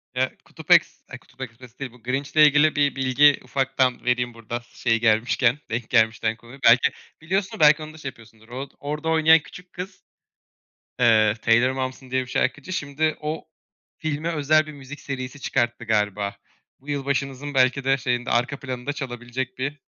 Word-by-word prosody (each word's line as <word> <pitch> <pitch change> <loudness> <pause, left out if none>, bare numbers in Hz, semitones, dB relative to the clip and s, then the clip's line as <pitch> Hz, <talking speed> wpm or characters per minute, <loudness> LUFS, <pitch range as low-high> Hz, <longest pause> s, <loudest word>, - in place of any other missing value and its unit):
Eee, 130 0 -1
Kutup - - -9
Eks - - +4
A, - - -8
Kutup - - -19
Ekspresi 125 0 -10
değil, 135 -3 -5
bu 120 -2 -20
Grinch 135 +3 -2
ile 155 - +8
ilgili 150 +1 +3
bir 145 -1 +2
bilgi 135 +2 +4
ufaktan 130 -2 0
vereyim 125 -1 0
burada 115 +1 -6
s 120 - -25
şey 115 0 +4
gelmişken, 120 +3 +2
denk 115 0 -3
gelmişken 110 -1 +2
konuyu. 120 +4 -14
Belki 120 +2 +6 0.3
biliyorsundur, 190 +4 -2
belki 155 0 +6
onu 155 0 -9
da - - -13
şey 140 -3 -5
yapıyorsundur. 115 -2 -18
Or 130 +3 -6
orada 150 +2 -3
oynayan 160 0 +6
küçük 180 +3 -14
kız, 185 +2 -8 1.0
eee, 110 -3 +5
Taylor 120 +3 +4
Momsen 130 0 -5
diye 130 0 +1
bir 130 - -7
şarkıcı, 135 +7 -1
şimdi 150 +1 -1
o 150 +1 -4 0.5
filme 155 0 -3
özel 155 0 +2
bir - - -7
müzik 140 +1 -10
serisi 130 0 -6
çıkarttı 120 -3 -1
galiba. 105 -2 0 0.4
Bu 140 - -15
yılbaşımızın 140 0 -2
belki 130 0 +3
de 135 +1 +2
şeyinde, 125 0 -2
arka 120 +4 0
planında 130 +1 -4
çalabilecek 125 -2 -5
bir 140 +2 -4
130 Hz, 175 wpm, -23 LUFS, 120-145 Hz, 1.0 s, ile